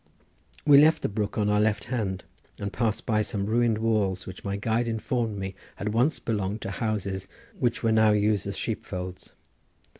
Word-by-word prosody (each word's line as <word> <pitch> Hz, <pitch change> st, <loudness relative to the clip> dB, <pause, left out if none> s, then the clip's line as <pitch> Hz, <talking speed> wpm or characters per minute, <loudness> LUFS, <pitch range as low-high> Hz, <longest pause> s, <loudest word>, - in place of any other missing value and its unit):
We 145 Hz, -2 st, +8 dB
left 155 Hz, +2 st, +5 dB
the -, -, +1 dB
brook 105 Hz, 0 st, -2 dB
on 105 Hz, -1 st, +2 dB
our 105 Hz, 0 st, +3 dB
left 105 Hz, -1 st, +1 dB
hand 105 Hz, -7 st, -2 dB, 0.3 s
and 100 Hz, -1 st, -4 dB
passed 115 Hz, -3 st, -1 dB
by 110 Hz, -2 st, +2 dB
some 100 Hz, -2 st, -2 dB
ruined 115 Hz, +1 st, +2 dB
walls 105 Hz, -4 st, 0 dB
which 95 Hz, 0 st, -9 dB
my 100 Hz, 0 st, -2 dB
guide 115 Hz, +3 st, 0 dB
informed 115 Hz, -1 st, -1 dB
me 95 Hz, -1 st, -4 dB, 0.2 s
had 105 Hz, +1 st, -3 dB
once 125 Hz, +7 st, +2 dB
belonged 105 Hz, -1 st, -2 dB
to 95 Hz, -, -4 dB
houses 100 Hz, -3 st, -2 dB, 0.3 s
but 120 Hz, -1 st, 0 dB
were 115 Hz, -, +3 dB
now 110 Hz, -1 st, +5 dB
used 105 Hz, -1 st, +2 dB
as 100 Hz, -, -4 dB
sheep 110 Hz, -, -2 dB
folds. 90 Hz, -1 st, -7 dB
105 Hz, 185 wpm, -27 LUFS, 100-115 Hz, 0.3 s, We